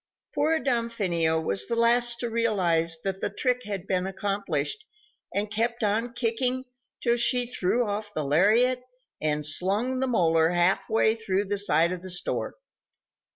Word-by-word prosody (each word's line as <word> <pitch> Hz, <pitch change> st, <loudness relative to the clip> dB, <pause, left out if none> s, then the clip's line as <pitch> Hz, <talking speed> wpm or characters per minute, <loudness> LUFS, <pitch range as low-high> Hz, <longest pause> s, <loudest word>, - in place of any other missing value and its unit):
Poor 310 Hz, +3 st, +1 dB
Damfino 205 Hz, -, 0 dB
was 100 Hz, -11 st, +1 dB
the 235 Hz, -, -1 dB
last 235 Hz, 0 st, +3 dB
to 240 Hz, -, -2 dB
realize 175 Hz, -8 st, +1 dB
that 195 Hz, -1 st, -3 dB
the -, -, -1 dB
trick 250 Hz, -1 st, -1 dB
had 200 Hz, -3 st, -5 dB
been 185 Hz, -1 st, -1 dB
accomplished, 195 Hz, -, -2 dB, 0.5 s
and 205 Hz, +1 st, -2 dB
kept 235 Hz, +2 st, -1 dB
on 225 Hz, +3 st, 0 dB
kicking 250 Hz, +2 st, 0 dB, 0.4 s
till 235 Hz, -1 st, +1 dB
she 245 Hz, +1 st, +3 dB
threw 240 Hz, 0 st, 0 dB
off 205 Hz, 0 st, -4 dB
the 155 Hz, -, -3 dB
lariat 215 Hz, -, +3 dB, 0.4 s
and 150 Hz, -1 st, -1 dB
slung 205 Hz, -, +2 dB
the 265 Hz, -, 0 dB
molar 165 Hz, -8 st, +2 dB
half 180 Hz, +3 st, +1 dB
way 220 Hz, 0 st, +3 dB
through 205 Hz, -3 st, -2 dB
the 205 Hz, +1 st, -2 dB
side 170 Hz, -4 st, +2 dB
of 180 Hz, -1 st, -5 dB
the 185 Hz, -, -9 dB
store. 175 Hz, -1 st, -2 dB
205 Hz, 155 wpm, -26 LUFS, 180-235 Hz, 0.5 s, last